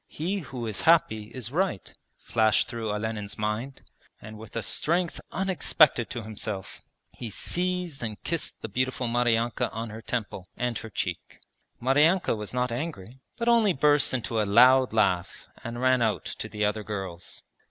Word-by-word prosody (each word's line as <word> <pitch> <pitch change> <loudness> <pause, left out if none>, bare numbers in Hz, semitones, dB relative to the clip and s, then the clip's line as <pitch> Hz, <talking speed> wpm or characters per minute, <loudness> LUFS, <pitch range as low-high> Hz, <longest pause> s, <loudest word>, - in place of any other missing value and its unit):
He 185 +6 -2
who 130 -7 -6
is 110 -4 -3
happy 135 -10 +4
is 120 +1 -7
right,' 175 - -1 0.3
flashed 110 -2 +2
through 115 -2 -4
Olenin's 105 -1 -4
mind, 105 +6 -3 0.4
and 110 0 -10
with 110 0 -12
a 115 - -2
strength 170 +2 +1
unexpected 175 - +3
to 120 -2 -5
himself 105 -2 -6 0.3
he 120 - -7
seized 180 - -2
and 110 -3 -5
kissed 170 -2 -3
the - - -2
beautiful 130 +3 -1
Maryanka 120 -1 +1
on 115 0 -5
her 110 +1 -8
temple 105 -6 -4
and 120 -1 -1
her 115 - -8
cheek. 90 -4 -4 0.4
Maryanka 150 +6 +3
was 105 -1 -6
not 125 -1 0
angry, 125 - -5 0.2
but 235 - -2
only 230 -5 +5
burst 150 0 +3
into 115 -3 -1
a - - +2
loud 125 +5 +6
laugh 95 -5 +1 0.2
and 115 +1 -5
ran 130 0 +3
out 110 -2 0
to 110 - -6
the 105 -1 -1
other 105 +1 0
girls. 95 -5 -6
115 Hz, 165 wpm, -27 LUFS, 110-140 Hz, 0.4 s, loud